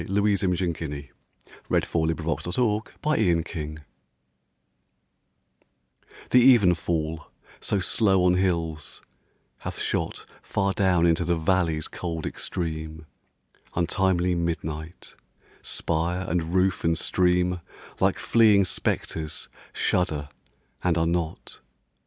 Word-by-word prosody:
Louise 100 0 +2
Imogen 90 -2 +1
Guiney 75 -3 -6 0.6
The - - -4
Lights - - 0
of 80 +1 -1 0.5
London 90 - +2 2.9
THE 125 0 +8
evenfall, 85 -5 0 0.3
so 100 - -1
slow 95 0 +2
on 90 - +5
hills, 85 -4 -1 0.6
hath - - -6
shot - - -2 0.2
Far 100 -1 0
down 90 -3 +3
into 85 0 +3
the 85 +1 +1
valley's 80 -2 +1
cold 85 -2 -5
extreme, 80 -2 -4 0.7
Untimely 90 +1 +1
midnight; 80 -1 -4 0.5
spire 85 +3 -1
and 85 -1 -1
roof 95 0 +1
and 80 0 +2
stream 90 +1 +1 0.4
Like - - +2
fleeing 105 -4 +4
spectres, 80 -3 -3 0.2
shudder 80 -5 0 0.5
and 85 -2 +2
are 80 - +2
not. 85 -1 -3
85 Hz, 100 wpm, -25 LUFS, 80-95 Hz, 2.9 s, THE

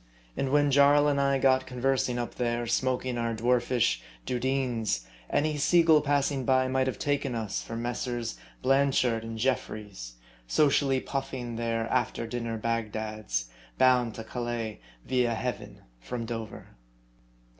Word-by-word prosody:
And 135 - -1
when 145 0 +3
Jarl 145 +1 +6
and 140 -1 +2
I 140 0 +2
got 130 -1 +3
conversing 125 -1 0
up 120 -1 -3
there, 120 -1 -1
smoking 125 +1 0
our 115 -1 -1
dwarfish 120 - +1
" - - -26
dudeens," 125 - -1 0.2
any 150 +1 +1
*sea 170 +4 +4
gull 160 -2 +6
passing 140 -2 +1
by 130 +1 +3
might 130 0 +1
have 125 -5 -2
taken 140 -3 -1
us 110 -4 -2
for 115 - -7
Messrs. 120 - -3 0.3
Blanchard 130 -4 +2
and 115 0 -6
Jeffries, 105 - -3 0.3
socially 135 - +3
puffing 135 -4 -4
their 115 -1 -1
after 125 -2 0
dinner 115 0 -3
Bagdads, 110 - -2 0.3
bound 125 -3 +4
to 115 - -6
Calais, 120 -2 -4 0.3
via 125 -2 +1
Heaven, 125 +2 -5 0.2
from 115 - -5
Dover. 115 -2 -6
125 Hz, 140 wpm, -28 LUFS, 115-135 Hz, 0.3 s, Jarl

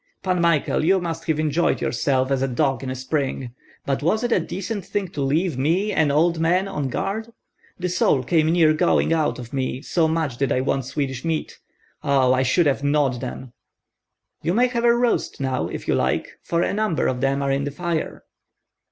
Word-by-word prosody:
"Pan 185 -2 +1
Michael, 165 -3 +2
you 190 +4 +4
must 165 -2 -4
have 155 -2 +1
enjoyed 155 +2 +1
yourself 130 +2 0
as 135 -1 +1
a 135 - +1
dog 135 0 0
in 130 - -5
a 130 - -3
spring. 130 -2 -3 0.3
But 135 -1 -1
was 210 +10 +1
it 240 - -1
a - - +4
decent 200 +2 -4
thing 195 0 -3
to 155 -5 -5
leave 150 +1 0
me, 175 +9 +1
an 155 -6 +2
old 160 +3 +2
man, 180 +4 +2
on 145 -8 -3
guard? 220 - -3 0.5
The 180 - -2
soul 170 -7 +2
came 155 +3 +2
near 165 -2 +4
going 155 +1 +2
out 155 -2 +1
of 120 0 -9
me, 130 0 -2
so 165 -1 +1
much 160 -6 -1
did 135 +1 0
I - - +2
want 135 -1 -1
Swedish 135 -2 -3
meat. 165 -2 -3 0.4
Oh, 135 -2 +3
I 130 - +2
should 135 +7 +2
have 140 -1 +1
gnawed 145 -4 +1
them!" 130 -1 -7 0.9
"You 175 - 0
may 245 +2 +4
have 235 -1 -1
a 235 - +6
roast 240 -7 0
now 130 -1 -1
if - - -7
you - - +2
like, 65 -1 -1
for 170 0 0
a - - -1
number 210 -6 0
of 125 -1 -1
them 135 +1 +1
are 140 - 0
in 140 +1 0
the - - -2
fire." 170 +2 -3
155 Hz, 210 wpm, -22 LUFS, 135-175 Hz, 0.9 s, a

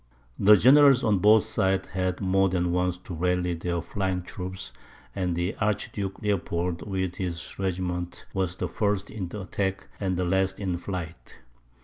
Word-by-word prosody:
The 105 +2 +8
generals 135 +3 +6
on 105 -4 +3
both 105 +2 +5
sides 95 -3 0
had 95 0 -2
more 95 0 +3
than 90 -1 0
once 90 0 0
to 90 0 -9
rally 90 +1 0
their 85 0 -3
flying 95 -2 -2
troops; 95 +1 -7 0.4
and 90 -3 -1
the 90 +4 -1
Archduke 100 -2 -2
Leopold, 90 -4 -1
with 95 -2 -2
his 90 -2 -4
regiment, 90 -2 -3
was 95 -2 -1
the - - -3
first 100 -1 -1
in 100 -5 -4
the 105 +4 -6
attack 95 0 -3
and 95 -3 -1
last 95 +1 +1
in 95 -3 -1
flight. 85 -2 -6
95 Hz, 155 wpm, -26 LUFS, 90-100 Hz, 0.4 s, The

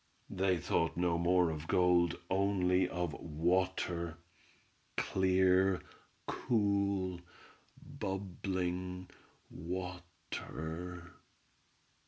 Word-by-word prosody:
They 95 -1 +2
thought 85 0 0
no 85 -1 +2
more 90 0 +3
of 80 0 -6
gold, 90 -1 +3
only 95 -1 +2
of 90 -3 -2
water—clear, 85 +1 0 2.1
cool, 100 -4 +1 0.6
bubbling 90 -1 -3 0.4
water. 90 -1 -6
90 Hz, 60 wpm, -34 LUFS, 85-95 Hz, 2.1 s, more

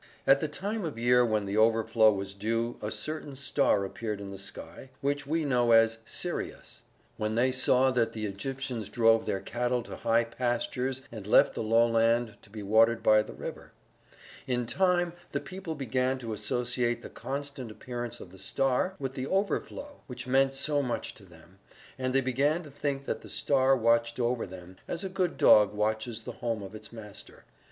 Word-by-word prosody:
At 135 - +6
the 155 - -1
time 200 +8 -4
of 155 -7 -4
year 125 +1 +4
when 110 -3 0
the 100 +2 -2
overflow 110 0 +4
was 100 -1 -4
due 115 +4 -2
a 105 - -3
certain 145 +6 -4
star 135 -6 +1
appeared 105 +1 -4
in 100 -1 -7
the 95 - -8
sky, 100 +6 -9
which 145 0 -1
we 160 +1 0
know 120 -4 +3
as 115 0 +5
Sirius. - - -4 0.4
When 110 0 -1
they 125 +3 +3
saw 130 0 +4
that 115 -3 +1
the 110 -1 -3
Egyptians 120 +2 -4
drove 115 -1 +3
their 95 - 0
cattle 120 +3 -1
to - - -8
high 115 +1 +2
pastures 125 +2 -2
and 110 -4 -8
left - - +5
the - - -4
lowland 115 0 +3
to - - -19
be 105 0 -8
watered 115 +3 +4
by 110 0 +6
the - - -9
river. - - -8 0.7
In 125 -2 0
time 175 +4 +1 0.2
the - - 0
people 185 -4 -6
began 130 -1 0
to 115 -4 -5
associate 120 +3 -1
the - - -8
constant 140 -3 -5
appearance 120 +1 -6
of 90 - -11
the 95 - -14
star 135 - 0
with 135 -5 -4
the 130 0 -4
overflow 205 - -2
which 125 - -7
meant 135 +1 +3
so 145 +1 +1
much 125 -3 -3
to 100 - -16
them, 85 +2 -19 0.4
and 130 0 -1
they 135 - +5
began 140 +6 +1
to 150 - -12
think 140 -1 -3
that - - -3
the - - -12
star 135 -1 +2
watched 115 0 +2
over 120 -2 0
them, 90 0 -11
as 175 - -4
a 190 - -3
good 185 -2 -1
dog 105 -1 +6
watches 110 +2 -1
the 125 - -6
home 115 -4 -2
of 95 - -9
its 110 0 -10
master. 105 -3 -11
120 Hz, 190 wpm, -29 LUFS, 110-135 Hz, 0.7 s, At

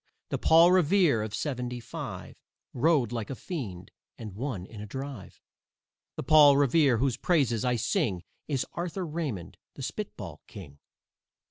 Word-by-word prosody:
The - - -2
Paul 165 +2 +6
Revere 180 - +4
of 105 0 -4
"seventy 125 -1 -3
five" 115 - -7 0.4
Rode 135 -3 +2
like 115 -3 -4
a 135 - -4
fiend 105 - -6 0.3
and 110 -4 -8
won 110 -4 -4
in 105 +1 -10
a 105 - -7
drive. 135 -1 -8 0.8
The - - -5
Paul 145 -1 +7
Revere 140 -2 +4
whose 130 0 0
praises 135 - +1
I 125 -1 +1
sing 110 - -1 0.2
Is 135 -4 -1
Arthur 175 +2 -4
Raymond, 150 - -5 0.2
the - - -8
spitball - - -6
king. 75 -8 -11
130 Hz, 145 wpm, -28 LUFS, 110-155 Hz, 0.8 s, Paul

